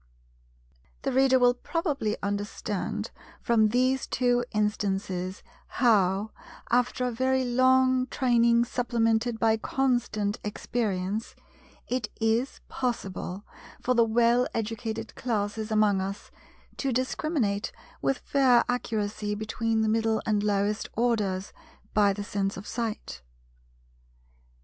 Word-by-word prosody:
The - - 0
Reader 265 0 +4
will 245 -1 +5
probably 280 - -2
understand 205 0 -3 0.3
from 225 -3 +3
these 255 +3 +1
two 245 -1 +1
instances 195 -3 -1 0.2
how—after 225 +3 0
a 250 - 0
very 260 +2 +1
long 255 +1 +3
training 235 -2 +3
supplemented 235 -1 0
by 225 -1 +3
constant 225 -4 0
experience—it 215 +3 -4
is 225 +4 0
possible 205 -6 -4 0.3
for 255 - +1
the 235 -1 +5
well 235 +2 +3
educated 225 0 -3
classes 215 -2 -2
among 210 -3 +3
us 195 +2 -5 0.5
to 275 - -1
discriminate 255 -4 -1 0.3
with 270 - +1
fair 260 -4 +4
accuracy 215 -4 -2
between 220 +1 -1
the 220 - +1
middle 225 0 +1
and 210 -2 +1
lowest 205 +1 0
orders, 210 -5 0 0.4
by 205 -1 +4
the 205 +1 -4
sense 200 -1 -2
of 195 - -8
sight. 220 - -4
225 Hz, 105 wpm, -27 LUFS, 205-245 Hz, 0.5 s, will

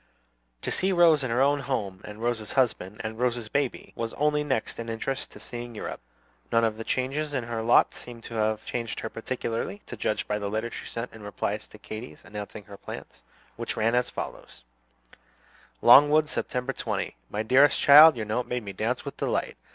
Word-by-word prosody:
To - - -2
see 190 +1 +2
Rose 170 -5 +5
in 130 - -2
her 120 +3 +3
own 145 +1 +3
home, 105 -9 -3
and 105 +2 -9
Rose's 120 -3 -1
husband, 110 -6 0
and 110 +1 -5
Rose's 120 -3 0
baby, 140 0 -2
was 115 -1 -4
only 150 0 +2
next 135 -7 -2
in 115 0 -5
interest 120 +4 -3
to - - -13
seeing 120 -1 -7
Europe. - - -5 0.5
None 115 0 +4
of 110 -1 +1
the 115 - -5
changes 140 +5 -1
in 130 - -1
her 115 -1 -3
lot 115 +2 +4
seemed 120 -2 -9
to - - -8
have 110 -1 0
changed 115 -2 -3
her 115 - -5
particularly, 115 -3 -4
to - - -7
judge - - -1
by 105 - -1
the 100 -1 -3
letter 110 +3 -2
she - - -7
sent 115 +1 -5
in 110 - -11
reply 105 0 -2
to 105 0 -14
Katy's 110 +3 -9
announcing 105 0 -7
her 100 0 -12
plans, 65 - -9 0.4
which - - -4
letter 110 - +1
ran - - -2
as 125 0 +2
follows: - - -7 1.2
"LONGWOOD, 150 +1 +7
September 125 -3 -2
20. - - -3
"My 105 +1 -2
dearest 130 +6 +5
child, 150 +3 +9
Your 110 - -3
note 110 +4 -1
made 125 -1 -2
me 100 -1 -6
dance - - -2
with - - -6
delight. - - -1
115 Hz, 200 wpm, -27 LUFS, 110-135 Hz, 1.2 s, child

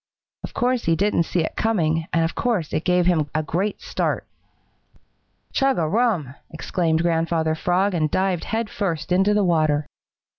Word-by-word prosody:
Of - - -7
course 250 0 0
he 165 - +3
didn't 185 -2 +1
see 175 - +1
it 160 - -3
coming, 165 -7 0
and 165 - +2
of 165 - -3
course 215 -11 -1
it 155 - 0
gave 180 -1 +3
him 160 -5 +2
a 155 - +1
great 185 +7 -2
start. - - -2 1.3
"Chug 270 -1 +2
a 165 -3 +1
rum!" 190 - 0 0.2
exclaimed 160 0 -1
Grandfather 165 -1 +1
Frog 180 +5 +1
and 155 -3 +1
dived 185 +1 0
head 225 0 -2
first 170 -5 -3
into 195 +3 +3
the 210 - +3
water. 155 -4 +2
175 Hz, 170 wpm, -22 LUFS, 160-200 Hz, 1.3 s, he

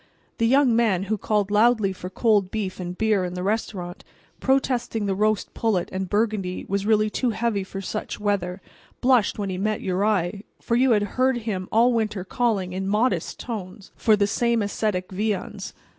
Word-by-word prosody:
The 230 - +3
young 265 -1 +4
man 215 -6 +2
who 210 +2 -1
called 210 -1 0
loudly 215 -2 +3
for 180 -1 -7
cold 205 -1 +2
beef 200 -4 -4
and 180 0 -5
beer 215 -3 +2
in 180 0 -4
the 180 - -4
restaurant, 190 -4 -3 0.4
protesting 250 -5 0
that 195 - 0
roast 215 +1 0
pullet 205 -6 0
and 190 -1 -3
Burgundy 205 -4 -1
was 200 +1 -1
really 215 -1 +3
too 250 - 0
heavy 225 -3 -1
for 195 +1 -7
such 210 +2 -5
weather, 195 -3 -1 0.4
blushed 250 -4 +3
when 200 -2 -2
he 180 - -4
met 215 +2 -1
your 185 +1 -1
eye, 200 -2 0 0.2
for 235 - -1
you 250 0 +4
had 210 -1 +2 0.2
heard 260 -1 +3
him 185 -4 -3
all 235 +3 +4
winter 215 -4 -1
calling, 195 -3 -1
in 190 +1 -3
modest 215 +6 0
tones, 200 -4 -7
for 220 - +4
the 205 -1 +2
same 230 +2 +1
ascetic 200 -3 -2
viands. 205 0 -3
210 Hz, 185 wpm, -24 LUFS, 190-225 Hz, 0.4 s, young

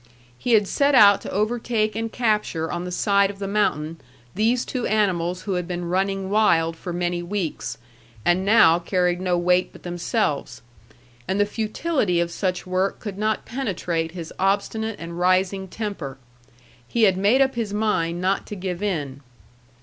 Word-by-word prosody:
He 240 - -1
had 210 -3 +4
set 280 +5 +2
out 205 -5 +7
to - - -7
overtake 215 0 0
and 225 0 -3
capture 210 -9 0
on 175 +1 -3
the 180 - -5
side 200 +1 +2
of 200 - -8
the 200 0 -4
mountain 165 -6 -1 0.3
these 230 +5 +1
two 250 -3 -2
animals 185 -4 0
who 200 - -2
had 180 -1 -2
been 175 -1 -4
running 195 +1 -1
wild 165 -6 +3
for 175 - -7
many 175 0 -1
weeks, 175 -2 -3 0.5
and 175 +2 +3
now 200 -5 +6
carried 180 0 0
no 180 -1 +1
weight 180 +1 +2
but - - -15
themselves, 175 - -2 0.6
and 195 - 0
the 205 - +4
futility 215 - -1
of 170 0 0
such 180 -1 -2
work 185 +1 -1
could 205 -3 -6
not 215 0 0
penetrate 180 -10 -2
his 170 -3 -7
obstinate 205 +3 0
and 170 +1 -7
rising 185 +1 +2
temper. 185 - -5 0.7
He 235 - 0
had 195 -3 +5
made 205 +7 +3
up 265 0 +3
his 230 -4 -3
mind 200 -5 0
not 190 +2 0
to 210 - -6
give 185 -1 -4
in. 145 -9 -3
190 Hz, 170 wpm, -23 LUFS, 175-215 Hz, 0.7 s, out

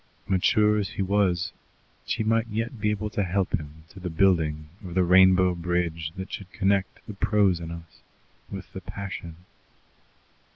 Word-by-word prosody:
Mature 105 +2 +3
as 100 - -2
he 100 - -2
was, 95 -3 +1 0.5
she - - 0
might 115 +1 +2
yet 115 +1 -3
be 105 - +2
able 105 0 -2
to 105 - -1
help 95 0 -1
him 75 0 -4
to 95 - -12
the 90 -1 -4
building 80 -3 +2 0.2
of 90 -2 -7
the 95 - +4
rainbow 95 0 +6
bridge 85 -2 -2
that 95 0 -6
should 95 -2 -7
connect 95 0 0
the 105 - -7
prose 100 -3 +2
in 85 -1 -6
us 85 0 -10 0.5
with 95 -1 -8
the 95 - -6
passion. 95 -4 -6
95 Hz, 165 wpm, -26 LUFS, 85-100 Hz, 0.5 s, rainbow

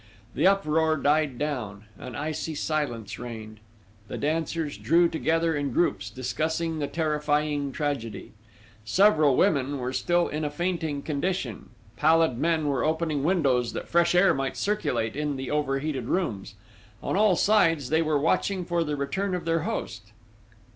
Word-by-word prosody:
The - - +3
uproar 160 -5 +2
died 145 -2 +1
down; 120 -9 -4 0.2
an 125 -3 -8
icy 155 +1 -3
silence 145 -9 -3
reigned. 110 -3 -8 0.5
The - - -5
dancers 160 0 -2
drew 170 +2 +4
together 165 +1 0
in 145 -2 -2
groups 105 - 0
discussing 155 +7 -2
the 145 - -1
terrifying 150 -2 0
tragedy.... 135 -7 -4 0.5
Several 155 - +4
women 140 0 +2
were 125 0 -3
still 175 +6 +1
in 150 +1 -3
a 150 - 0
fainting 160 -2 -2
condition; 145 - -3 0.3
pallid 160 -3 +3
men 160 -2 +1
were 140 -2 0
opening 155 -2 0
windows 135 -9 +1
that - - -5
fresh 170 +1 +3
air 180 +2 +5
might 135 -1 -3
circulate 165 - -1
in 150 -1 -2
the 135 0 -5
overheated 135 -2 -1
rooms; 115 - -2 0.5
on - - -1
all 205 -2 +4
sides 165 -10 +2
they 160 +1 +3
were 155 -2 +1
watching 180 +5 0
for 170 -1 0
the 150 -2 -2
return 185 +8 -2
of 180 - -5
their 165 0 +1
host. 105 - -5
150 Hz, 150 wpm, -26 LUFS, 135-165 Hz, 0.5 s, air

